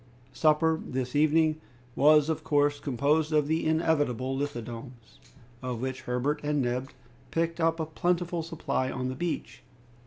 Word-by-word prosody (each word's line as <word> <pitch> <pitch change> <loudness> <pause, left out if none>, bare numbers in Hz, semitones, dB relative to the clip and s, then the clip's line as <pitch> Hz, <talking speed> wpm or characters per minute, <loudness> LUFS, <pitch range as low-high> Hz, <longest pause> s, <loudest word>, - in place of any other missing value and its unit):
Supper, 160 +2 +3
this 130 0 -4
evening, 155 +1 +3 0.3
was 150 +1 +5
of 160 -1 -2
course 145 -1 +2
composed 145 +4 +1
of 150 -2 +3
the 160 +1 0
inevitable 145 -5 +1
lithodomes, 120 -3 -6 0.4
of 125 -2 -4
which 130 +1 -3
Herbert 125 +4 -1
and 150 0 0
Neb 125 +1 -1 0.4
picked 165 +2 -1
up 165 0 +2
a 160 - 0
plentiful 175 +2 -1
supply 155 -5 -2
on 130 -1 -3
the 130 - -4
beach. 170 +4 -4
145 Hz, 145 wpm, -28 LUFS, 130-160 Hz, 0.4 s, was